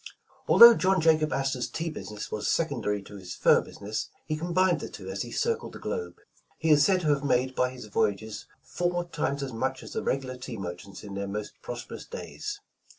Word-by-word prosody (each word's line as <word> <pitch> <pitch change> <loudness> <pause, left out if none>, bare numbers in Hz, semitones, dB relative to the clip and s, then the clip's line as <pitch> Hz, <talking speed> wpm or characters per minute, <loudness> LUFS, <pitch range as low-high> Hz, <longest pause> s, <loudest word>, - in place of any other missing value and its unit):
Although 235 0 +11
John 190 0 +3
Jacob 155 -2 +3
Astor's 130 -2 -1
tea 165 +6 -3
business 105 -8 -7
was 105 - -2
sec 165 - +2
ondary 105 -6 -2
to 100 - -10
his 90 -2 -8
fur - - +5
business, 105 +2 -5 0.2
he 155 - -1
combined 175 +3 +2
the - - -6
two - - -8
as - - -3
he - - -4
circled 465 0 -1
the - - -7
globe. 455 -2 -4 0.4
He 160 0 +1
is 145 -1 +7
said 185 0 +3
to 155 - 0
have 145 -1 +2
made 130 -1 +2
by 125 -1 +1
his 125 -2 -9
voy 105 - +2
ages, 110 +1 -9 0.2
"four 175 0 -1
times 150 -4 -2
as 130 -3 -5
much 130 +3 -2
as - - -9
the - - -1
regular 130 -1 -2
tea 125 -2 -7
mer 90 -3 -4
chants 95 +2 -12
in 100 - -8
their 100 0 -3
most 105 +1 -4
prosperous 120 -1 -7
days. 420 -3 -6
135 Hz, 215 wpm, -28 LUFS, 105-165 Hz, 0.4 s, Although